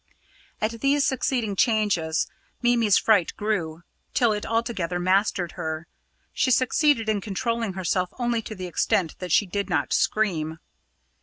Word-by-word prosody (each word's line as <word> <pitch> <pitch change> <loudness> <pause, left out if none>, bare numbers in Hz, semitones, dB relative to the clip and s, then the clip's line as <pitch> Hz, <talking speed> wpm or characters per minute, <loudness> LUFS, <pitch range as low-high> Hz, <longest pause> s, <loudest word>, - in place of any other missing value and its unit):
At 225 +1 -2
these 280 +1 +3
succeeding 250 -6 0
changes 200 -8 +1 0.4
Mimi's 235 -4 +4
fright 205 -6 +2
grew, 175 -6 -2 0.3
till 235 -3 +3
it 210 - -4
altogether 225 -7 -1
mastered 185 -1 +1
her. 160 -2 -4 0.5
She - - +1
succeeded 255 -1 +3
in 215 -2 0
controlling 230 +1 -2
herself 185 0 -1
only 240 -2 0
to 215 - -8
the 185 -1 -6
extent 175 -1 0
that 180 -2 -5
she 205 - +4
did 200 +1 -3
not 175 - 0
scream. 165 -7 0
205 Hz, 140 wpm, -25 LUFS, 180-230 Hz, 0.5 s, Mimi's